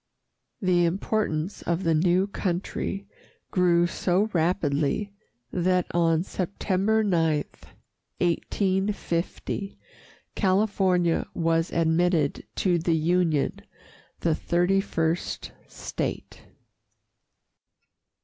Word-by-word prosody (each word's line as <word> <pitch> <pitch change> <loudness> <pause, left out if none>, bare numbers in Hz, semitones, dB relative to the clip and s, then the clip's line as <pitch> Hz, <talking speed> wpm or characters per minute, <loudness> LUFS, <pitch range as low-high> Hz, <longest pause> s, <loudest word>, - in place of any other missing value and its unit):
The 180 -2 +3
importance 185 -1 -1
of 170 +2 -1
the 165 - +2
new 175 +4 +3
country 195 0 -3 0.5
grew 175 -2 +3
so 185 +4 0
rapidly 165 +2 0 0.4
that 180 0 +2
on 165 -1 +2
September 195 +3 0
9, 165 -6 +2 0.7
1850, 190 +1 -1 0.6
California 190 -3 +2
was 165 0 +1
admitted 165 -2 +1
to 180 -3 +2
the 165 0 +1
Union, 165 -2 +1 0.6
the 165 - +2
thirty 180 +4 +1
first 165 -3 -2 0.2
state. - - -5
175 Hz, 80 wpm, -26 LUFS, 165-190 Hz, 0.7 s, The